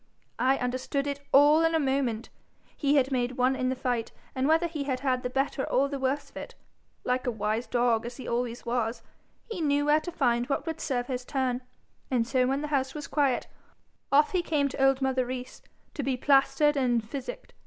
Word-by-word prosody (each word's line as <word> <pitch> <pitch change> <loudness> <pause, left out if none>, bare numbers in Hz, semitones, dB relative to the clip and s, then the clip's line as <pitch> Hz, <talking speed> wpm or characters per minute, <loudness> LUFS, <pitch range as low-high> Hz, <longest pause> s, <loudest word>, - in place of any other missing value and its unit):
I 265 +1 +3
understood 255 +3 -2
it 280 -1 -3
all 290 +3 +6
in 325 0 +2
a - - +3
moment. 265 -5 -1 0.5
He 285 -1 +1
had 270 -1 +3
made 250 -1 0
one 255 +1 +2
in 255 -1 -1
the 260 - -1
fight, 245 -3 -2 0.2
and 260 +1 0
whether 325 +2 +3
he 310 -4 -3
had 260 -2 -2
had 255 -2 +1
the 250 - -3
better 270 +1 -1
or 275 +2 +2
the 280 -1 -4
worse 270 +2 -1
of - - -12
it, - - -8 0.5
like 250 0 -1
a - - +2
wise 220 +2 -2
dog 240 -2 +1
as 240 - -8
he 260 - -8
always 240 0 -2
was, 235 -1 -1 0.5
he 380 -6 -3
knew 290 -1 +2
where 300 +1 +4
to 350 - -6
find 240 -6 +1
what 280 - -1
would 325 -1 -4
serve 250 -4 -1
his 250 -1 -4
turn, 255 -1 -1 0.5
and 245 -3 +1
so 255 0 +1
when 270 +2 0
the 300 - -4
house 265 0 0
was 295 - -5
quiet, 280 -4 +1 0.7
off 290 +2 +5
he 365 - +1
came 300 -4 +1
to 270 - -2
old 270 0 +3
mother 260 -1 +1
Rees 255 0 -6 0.3
to - - -3
be 265 -1 -1
plaistered 275 +2 +3
and 240 -5 +1
physicked. 275 - -7
265 Hz, 215 wpm, -28 LUFS, 250-285 Hz, 0.7 s, all